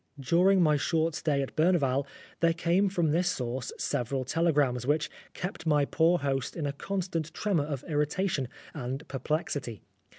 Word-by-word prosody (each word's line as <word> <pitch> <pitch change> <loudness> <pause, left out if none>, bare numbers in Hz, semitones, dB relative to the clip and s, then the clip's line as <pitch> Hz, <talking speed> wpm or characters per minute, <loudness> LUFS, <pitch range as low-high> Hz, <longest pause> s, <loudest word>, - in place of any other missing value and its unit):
During 180 +7 +4
my 150 -2 +4
short 160 +2 +1
stay 145 -3 0
at 135 - -7
Berneval 145 -5 +2 0.3
there 165 -1 +3
came 175 +4 +2
from 175 -5 +1
this 175 +3 +2
source 125 0 -3
several 130 +2 -1
tele 165 +5 +2
grams, 130 -4 +1
which 150 +1 +1 0.2
kept 180 -2 -5
my 150 -2 +4
poor 165 +4 +3
host 135 -3 -2
in 160 - -2
a 140 - -1
constant 170 -1 -3
tremor 185 -9 +1
of 140 -4 -4
irritation 150 -1 0 0.3
and 135 -1 -5
perplexity. 135 - -3
150 Hz, 160 wpm, -29 LUFS, 135-170 Hz, 0.3 s, During